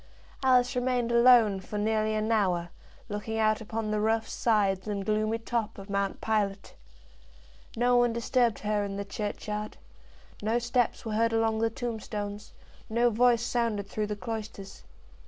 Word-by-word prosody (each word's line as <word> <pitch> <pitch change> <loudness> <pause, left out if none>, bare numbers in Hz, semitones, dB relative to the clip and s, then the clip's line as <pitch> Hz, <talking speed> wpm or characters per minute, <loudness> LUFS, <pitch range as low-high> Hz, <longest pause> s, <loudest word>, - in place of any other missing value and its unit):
Alice 255 -1 +3
remained 245 -1 0
alone 235 -4 +6
for 200 +3 -6
nearly 215 +1 +1
an 215 +1 -1
hour, 180 -6 +1 0.4
looking 215 +1 -4
out 215 0 +2
upon 220 0 -3
the 215 - 0
rough 220 +1 +1
sides 200 -4 +1
and 200 -2 -3
gloomy 215 +2 +1
top 225 -1 -3
of 200 0 -9
Mount 200 -1 -1
Pilate. 205 -3 -1 1.0
No 245 +1 +3
one 240 -1 +4
disturbed 235 0 +1
her 210 -1 0
in 200 -1 -4
the 200 - -4
churchyard, 210 +1 -4 0.6
no 220 +3 +1
steps 240 0 0
were 220 - -3
heard 230 +1 +2
along 225 -1 +1
the 225 0 +2
tombstones, 210 -3 -5 0.4
no 235 +2 +2
voice 240 +1 +3
sounded 230 -4 -1
through 210 +1 -2
the 210 - -3
cloisters. 210 -1 -7
220 Hz, 155 wpm, -28 LUFS, 210-235 Hz, 1.0 s, alone